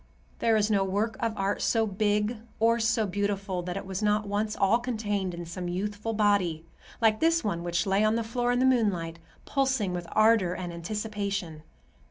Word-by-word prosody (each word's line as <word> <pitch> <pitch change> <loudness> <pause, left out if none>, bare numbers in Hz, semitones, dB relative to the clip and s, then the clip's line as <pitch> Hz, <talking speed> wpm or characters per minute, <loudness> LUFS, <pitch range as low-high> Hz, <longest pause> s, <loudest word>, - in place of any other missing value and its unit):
There 230 -1 +3
is 210 0 +1
no 200 -2 +3
work 205 +4 -1
of 230 -3 -2
art 195 +1 -1
so 225 -1 +2
big 210 +2 0 0.2
or 230 +1 +3
so 225 -1 +2
beautiful 200 -1 -2
that 180 +1 -4
it 195 - -6
was 190 0 -4
not 210 0 +1
once 210 +1 -1
all 200 +4 +3
contained 205 -6 -2
in 170 0 -6
some 175 +2 -5
youthful 205 +5 -3
body, 200 -7 +1 0.3
like 220 -2 +3
this 330 0 +3
one 185 -5 -1
which 170 0 -1
lay 195 +1 +2
on 215 +1 +3
the 230 - 0
floor 245 +2 -1
in 245 - +1
the 255 - +3
moonlight, 195 -10 +1 0.3
pulsing 265 -9 0
with 175 -1 -4
ardor 215 -5 +4
and 175 -2 -5
anticipation. 200 -2 -4
205 Hz, 190 wpm, -28 LUFS, 185-225 Hz, 0.3 s, ardor